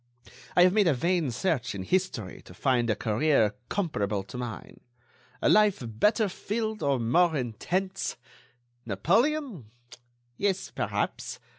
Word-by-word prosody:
I 175 Hz, -, +7 dB
have 180 Hz, 0 st, +5 dB
made 210 Hz, -3 st, +4 dB
a 155 Hz, -, +3 dB
vain 170 Hz, +2 st, +1 dB
search 125 Hz, -, -1 dB
in 95 Hz, -, -4 dB
history 125 Hz, -, -2 dB
to 90 Hz, -, -13 dB
find 120 Hz, +1 st, +1 dB
a 110 Hz, -, +2 dB
career 110 Hz, 0 st, +2 dB, 0.2 s
comparable 105 Hz, -, -1 dB
to 100 Hz, +6 st, -9 dB
mine; 120 Hz, -3 st, -7 dB, 0.6 s
a -, -, +4 dB
life 210 Hz, -8 st, +4 dB
better 210 Hz, -, +2 dB
filled 215 Hz, +3 st, -3 dB
or 140 Hz, -2 st, +1 dB
more 160 Hz, +9 st, +3 dB
intense.... 180 Hz, -, -2 dB, 0.7 s
Napoleon? 195 Hz, -, 0 dB, 0.7 s
Yes, 195 Hz, -2 st, -1 dB
perhaps.... -, -, -3 dB
155 Hz, 130 wpm, -28 LUFS, -, 0.7 s, I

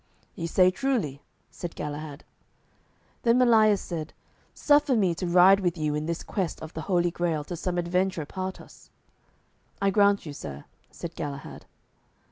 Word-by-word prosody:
"Ye 165 Hz, -, -4 dB
say 185 Hz, +2 st, +4 dB
truly," 190 Hz, -, -1 dB, 0.3 s
said 175 Hz, -1 st, -7 dB
Galahad. 150 Hz, 0 st, -6 dB, 1.0 s
Then 235 Hz, 0 st, +3 dB
Melias 220 Hz, -4 st, +5 dB
said, 160 Hz, -3 st, -6 dB, 0.4 s
"Suffer 290 Hz, -2 st, +3 dB
me 190 Hz, -6 st, +2 dB
to 180 Hz, +2 st, -4 dB
ride 180 Hz, +3 st, +6 dB
with 175 Hz, -3 st, -1 dB
you 155 Hz, -1 st, -1 dB
in 150 Hz, +1 st, -2 dB
this 170 Hz, 0 st, -3 dB
quest 185 Hz, -5 st, -3 dB
of 160 Hz, -, -9 dB
the 160 Hz, -, -5 dB
Holy 175 Hz, -2 st, +2 dB
Grail 165 Hz, -3 st, -1 dB
till 175 Hz, -, -6 dB
some 175 Hz, +1 st, -3 dB
adventure 175 Hz, -1 st, 0 dB
part 185 Hz, +4 st, -5 dB
us." -, -, -16 dB, 0.9 s
"I 200 Hz, 0 st, +2 dB
grant 200 Hz, -1 st, +3 dB
you, 150 Hz, -, -6 dB
sir," 70 Hz, -, -8 dB, 0.2 s
said 170 Hz, -, -8 dB
Galahad. 140 Hz, -3 st, -7 dB
175 Hz, 155 wpm, -27 LUFS, 155-195 Hz, 1.0 s, ride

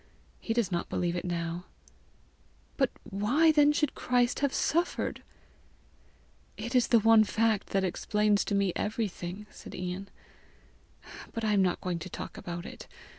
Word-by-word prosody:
He 225 Hz, -, -2 dB
does 225 Hz, -5 st, +1 dB
not 170 Hz, -1 st, -2 dB
believe 175 Hz, -1 st, -1 dB
it 175 Hz, -, -3 dB
now." 170 Hz, 0 st, -3 dB, 1.1 s
"But 270 Hz, -3 st, +2 dB
why 240 Hz, +12 st, +3 dB
then 295 Hz, -1 st, +5 dB
should 295 Hz, -1 st, 0 dB
Christ 245 Hz, -1 st, +1 dB
have 280 Hz, -1 st, +1 dB
suffered?" 340 Hz, +6 st, 0 dB, 1.4 s
"It 235 Hz, -, -5 dB
is 250 Hz, -2 st, +4 dB
the 235 Hz, -, +5 dB
one 225 Hz, 0 st, +6 dB
fact 220 Hz, -1 st, +1 dB
that 195 Hz, -1 st, 0 dB
explains 210 Hz, +3 st, +1 dB
to 205 Hz, -, -1 dB
me 200 Hz, -3 st, +2 dB
everything," 210 Hz, -2 st, -3 dB
said -, -, -10 dB
Ian. 180 Hz, +2 st, -5 dB, 0.6 s
" -, -, -16 dB
But 230 Hz, -, -4 dB
I 215 Hz, -1 st, +2 dB
am 200 Hz, -, +4 dB
not 180 Hz, -2 st, +1 dB
going 180 Hz, -2 st, -2 dB
to 185 Hz, -, -7 dB
talk -, -, -7 dB
about 175 Hz, 0 st, -6 dB
it. -, -, -9 dB
210 Hz, 160 wpm, -29 LUFS, 180-235 Hz, 1.4 s, one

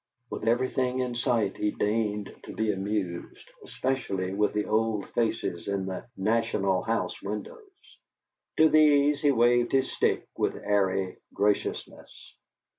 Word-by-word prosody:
With 110 Hz, -, -4 dB
everything 125 Hz, +1 st, +1 dB
in 125 Hz, -1 st, -1 dB
sight 120 Hz, -4 st, 0 dB
he 105 Hz, -, 0 dB
deigned 105 Hz, -1 st, -1 dB
to -, -, -8 dB
be 110 Hz, -1 st, +1 dB
amused, 95 Hz, -3 st, -4 dB, 0.2 s
especially 100 Hz, -8 st, -2 dB
with 105 Hz, +1 st, +1 dB
the 105 Hz, 0 st, -1 dB
old 110 Hz, -2 st, 0 dB
faces 115 Hz, -7 st, -1 dB
in 100 Hz, -1 st, -1 dB
the 95 Hz, -1 st, -6 dB
"National 100 Hz, -2 st, +1 dB
House" 115 Hz, 0 st, -2 dB
windows. 380 Hz, -, -8 dB, 0.6 s
To 160 Hz, -, +7 dB
these 150 Hz, -2 st, +4 dB
he 145 Hz, -, +4 dB
waved 120 Hz, -1 st, +3 dB
his 135 Hz, -1 st, +2 dB
stick -, -, 0 dB
with -, -, 0 dB
airy 95 Hz, -2 st, 0 dB, 0.2 s
graciousness. 105 Hz, 0 st, -2 dB
110 Hz, 130 wpm, -27 LUFS, 100-125 Hz, 0.6 s, To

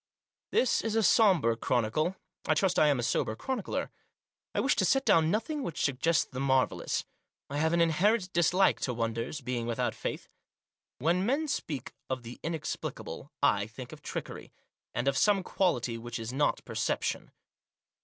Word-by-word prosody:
This 255 Hz, -, +2 dB
is 225 Hz, -1 st, -2 dB
a 225 Hz, -, +3 dB
sober 180 Hz, -, +4 dB
chronicle. 125 Hz, +10 st, 0 dB, 0.3 s
I -, -, +3 dB
trust 190 Hz, -2 st, +2 dB
I 150 Hz, -, +6 dB
am 145 Hz, -2 st, +3 dB
a -, -, -1 dB
sober 110 Hz, -1 st, 0 dB
chronicler. 255 Hz, -, -3 dB, 0.6 s
I -, -, +2 dB
wish -, -, +3 dB
to -, -, +3 dB
set 270 Hz, 0 st, +2 dB
down 160 Hz, -1 st, +4 dB
nothing 230 Hz, -, -1 dB
which 170 Hz, -, -3 dB
suggests 150 Hz, +5 st, +2 dB
the 130 Hz, -, -7 dB
marvellous. 130 Hz, -1 st, +1 dB, 0.5 s
I 145 Hz, -, -1 dB
have 160 Hz, +1 st, +2 dB
an 170 Hz, 0 st, +3 dB
inherent 185 Hz, +4 st, +2 dB
dislike 180 Hz, +3 st, +3 dB
to 125 Hz, -, -2 dB
wonders, 115 Hz, +5 st, -2 dB
being 120 Hz, -2 st, -3 dB
without 115 Hz, -, -1 dB
faith. -, -, -5 dB, 0.7 s
When 170 Hz, +6 st, +1 dB
men 280 Hz, +8 st, +1 dB
speak 145 Hz, -, -3 dB, 0.2 s
of 130 Hz, -2 st, -3 dB
the 120 Hz, +1 st, -9 dB
inexplicable 165 Hz, -1 st, -5 dB
I -, -, +3 dB
think -, -, -9 dB
of -, -, -11 dB
trickery, -, -, -6 dB, 0.4 s
and 120 Hz, +3 st, -1 dB
of 135 Hz, -1 st, +2 dB
some 200 Hz, -3 st, +3 dB
quality 125 Hz, -13 st, 0 dB
which 120 Hz, +1 st, -5 dB
is 115 Hz, +2 st, -5 dB
not 145 Hz, +2 st, +1 dB
perception. -, -, -2 dB
155 Hz, 165 wpm, -30 LUFS, 125-190 Hz, 0.7 s, I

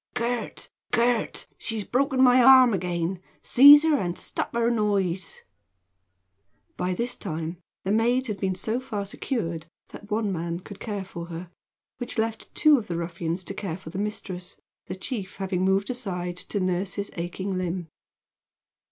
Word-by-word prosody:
"Gurt! 240 Hz, -1 st, -2 dB, 0.2 s
Gurt! 235 Hz, -1 st, +1 dB
she's 225 Hz, -3 st, -3 dB
broken 265 Hz, +3 st, +2 dB
my 250 Hz, 0 st, +7 dB
arm 255 Hz, -2 st, +8 dB
again! 175 Hz, 0 st, -2 dB, 0.2 s
Seize 285 Hz, +4 st, +9 dB
her 315 Hz, -2 st, +3 dB
and 175 Hz, -6 st, -2 dB
stop -, -, -3 dB
her 235 Hz, 0 st, +2 dB
noise!" 195 Hz, -5 st, -1 dB, 1.3 s
By 180 Hz, 0 st, -1 dB
this 240 Hz, +5 st, -2 dB
time 165 Hz, -1 st, -4 dB, 0.3 s
the 190 Hz, -, -1 dB
maid 240 Hz, +4 st, +2 dB
had 210 Hz, -5 st, -4 dB
been 190 Hz, -1 st, 0 dB
so 220 Hz, +6 st, -1 dB
far 220 Hz, -6 st, -4 dB
secured 170 Hz, -, -3 dB, 0.2 s
that 205 Hz, -, -12 dB
one 215 Hz, -1 st, 0 dB
man 170 Hz, 0 st, -3 dB
could 200 Hz, +1 st, -11 dB
care 205 Hz, -4 st, -4 dB
for 170 Hz, -2 st, -7 dB
her, 170 Hz, +1 st, -7 dB, 0.5 s
which 245 Hz, -, -3 dB
left 225 Hz, 0 st, -2 dB
two 305 Hz, -3 st, +6 dB
of 220 Hz, -, -9 dB
the 170 Hz, -, -3 dB
ruffians 170 Hz, +1 st, -3 dB
to 195 Hz, -, -4 dB
care 190 Hz, -4 st, -4 dB
for 160 Hz, -4 st, -10 dB
the 190 Hz, -, -4 dB
mistress, 195 Hz, -3 st, -5 dB, 0.3 s
the -, -, -4 dB
chief 195 Hz, -1 st, -5 dB
having 190 Hz, -1 st, -2 dB
moved 195 Hz, +4 st, +2 dB
aside 180 Hz, -8 st, -4 dB
to 205 Hz, -, -4 dB
nurse 185 Hz, +1 st, -1 dB
his 200 Hz, -1 st, -4 dB
aching 185 Hz, +3 st, -3 dB
limb. 180 Hz, -1 st, -2 dB
195 Hz, 160 wpm, -26 LUFS, 180-235 Hz, 1.3 s, Seize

